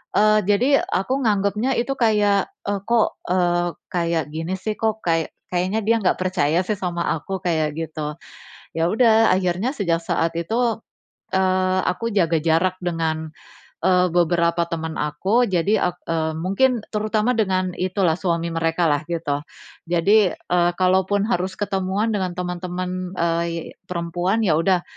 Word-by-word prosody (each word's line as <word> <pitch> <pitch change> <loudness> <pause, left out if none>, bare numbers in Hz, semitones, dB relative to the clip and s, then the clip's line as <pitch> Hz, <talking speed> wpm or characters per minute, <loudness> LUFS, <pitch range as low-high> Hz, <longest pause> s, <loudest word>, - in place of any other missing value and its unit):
Eee, 215 0 +5
jadi 240 +8 +3 0.2
aku 260 +8 0
nganggepnya 210 +4 +1
itu 245 +3 0
kayak, 210 -4 +3 0.2
"E 205 - 0
kok, 235 -2 +2
eee, 175 -1 +2 0.2
kayak 170 -2 0
gini 165 +3 -3
sih, 215 +3 -3
kok 220 -1 0
kayak 165 -2 0 0.2
kayaknya 185 +5 0
dia 230 +1 +3
nggak 185 - +2
percaya 180 -3 +1
sih 210 +1 -1
sama 175 -2 -3 0.2
aku?" 190 +4 -5
Kayak 160 -4 0
gitu. 155 -2 -4 0.6
Ya 165 +1 +2
udah 225 0 +4
akhirnya 185 +5 0
sejak 170 -6 0
saat 165 0 0
itu, 225 +6 0 0.6
eee, 185 0 +2
aku 230 +6 -1
jaga 170 -4 +2
jarak 165 +3 +2
dengan, 160 -2 -2 0.5
eee, 180 -1 +4
beberapa 170 0 +2
teman 160 -1 -4
aku, 190 +11 +1
jadi 190 +4 +2
ak - - -25
e 165 - 0 0.2
mungkin 230 +8 +2
terutama 215 +2 +1
dengan 185 -3 +1
itu 185 +2 -2
lah, 160 -2 +3
suami 170 -2 -1
mereka 165 +1 +1
lah 145 +1 0
gitu. 160 -4 -1 0.5
Jadi, 190 +3 +4
eee, 175 0 +1
kalaupun 190 +2 +2
harus 185 -3 -1
ketemuan 200 +2 -1
dengan 185 -3 -1
teman-teman, 180 0 -4
ey 170 0 -1
perempuan, 175 +4 -1
ya 165 -5 +3
udah, 180 +1 +2
185 Hz, 145 wpm, -22 LUFS, 170-205 Hz, 0.6 s, Eee